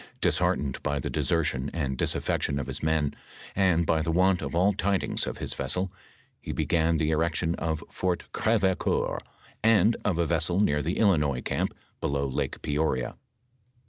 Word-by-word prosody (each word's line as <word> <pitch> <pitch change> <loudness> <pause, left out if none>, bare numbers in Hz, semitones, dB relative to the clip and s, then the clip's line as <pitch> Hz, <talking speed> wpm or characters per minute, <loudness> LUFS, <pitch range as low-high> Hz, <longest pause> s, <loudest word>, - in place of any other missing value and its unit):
Disheart - - +2
ened 70 -3 -4
by 70 0 -1
the 70 - -3
desertion 75 -5 0
and 70 -5 -1
disaffection 70 +2 0
of 70 - -2
his 70 +1 -6
men, 80 -2 +1 0.4
and 90 -4 +3
by 80 0 +2
the 85 - -2
want 90 +2 +3
of 70 +2 -4
all 95 +4 +4
tidings 100 0 0
of - - -4
his - - -2
vessel, 90 +8 -2 0.5
he - - -5
began 80 0 +1
the 80 0 +1
erection 80 +1 +1
of 80 -2 -2
Fort 90 -1 -1
GrevecoBur, 100 -5 +1 0.4
and 115 0 +5
of 95 -5 +1
a 85 - +2
vessel 85 +2 +1
near 75 -8 +3
the 85 +6 -2
Illinois 75 - +3
camp - - -1 0.2
below 70 0 0
Lake 65 - -3
Peoria. 75 -4 0
80 Hz, 165 wpm, -27 LUFS, 70-90 Hz, 0.5 s, and